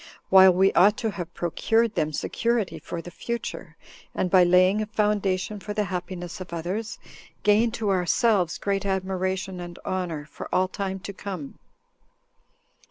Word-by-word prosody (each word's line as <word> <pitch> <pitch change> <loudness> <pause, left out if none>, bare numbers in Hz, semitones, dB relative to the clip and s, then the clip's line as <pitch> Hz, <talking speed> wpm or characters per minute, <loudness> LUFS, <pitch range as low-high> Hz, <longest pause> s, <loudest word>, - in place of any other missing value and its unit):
while 190 0 +9
we 190 +2 +3
ought 205 +3 +5
to 225 -2 -1
have 175 -3 -6
procured 225 +6 +1
them 155 -5 0
security 230 +6 -1
for 170 -1 -6
the 175 - -9
future, 195 -6 -5 0.4
and, 180 - -1
by 185 0 +7
laying 185 +4 +4
a 215 - -3
foundation 210 -2 0
for 205 +1 -6
the 210 - +1
happiness 180 -1 -5
of 185 - -8
others, 185 +7 -4 0.5
gain 210 +3 +4
to 220 -3 -2
ourselves 185 0 +2
great 195 -1 -1
admiration 190 -1 -2
and 175 0 -8
honor 175 -5 -3
for 150 - -9
all 185 0 +2
time 190 0 -4
to 200 +1 -7
come." 185 -7 -7
190 Hz, 155 wpm, -25 LUFS, 180-210 Hz, 0.5 s, while